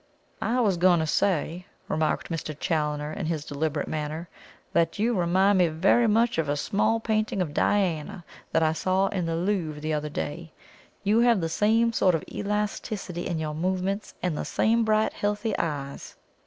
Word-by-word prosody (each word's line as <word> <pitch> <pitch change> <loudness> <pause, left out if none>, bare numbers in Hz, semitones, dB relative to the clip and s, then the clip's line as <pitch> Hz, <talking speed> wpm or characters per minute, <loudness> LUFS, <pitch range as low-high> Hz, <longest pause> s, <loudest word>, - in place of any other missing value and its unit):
"I 240 +3 +1
was 200 -6 +2
going 175 0 +4
to - - 0
say," 175 +1 0 0.2
remarked 155 0 -1
Mr. 155 -2 -4
Challoner 150 -1 -1
in 170 -3 -3
his 155 -3 -2
deliberate 145 0 -2
manner, 155 +2 -4 0.5
"that 165 -1 +2
you 230 +4 +1
remind 190 +1 +3
me 180 - +5
very 190 +9 +3
much 230 -1 +2
of 155 -3 0
a 145 - 0
small 220 +8 +1
painting 215 -2 -1
of 165 -5 -1
Diana 180 -1 0 0.3
that 160 - +2
I 155 0 +2
saw 190 +3 +1
in 180 -4 -2
the 165 - -1
Louvre 170 -4 -1
the 155 +1 -2
other 150 0 -2
day. 155 +3 -5 0.5
You 210 +3 +3
have 235 -3 +4
the 165 -2 -1
same 225 +6 +2
sort 185 -5 +3
of 160 - -2
elasticity 205 -3 -3
in 170 - -2
your 155 -1 -3
movements, 185 +5 -2
and 180 -4 0
the - - -3
same 230 +1 +2
bright 215 0 +2
healthy 205 +1 -1
eyes." 140 -4 -4
180 Hz, 180 wpm, -26 LUFS, 155-205 Hz, 0.5 s, me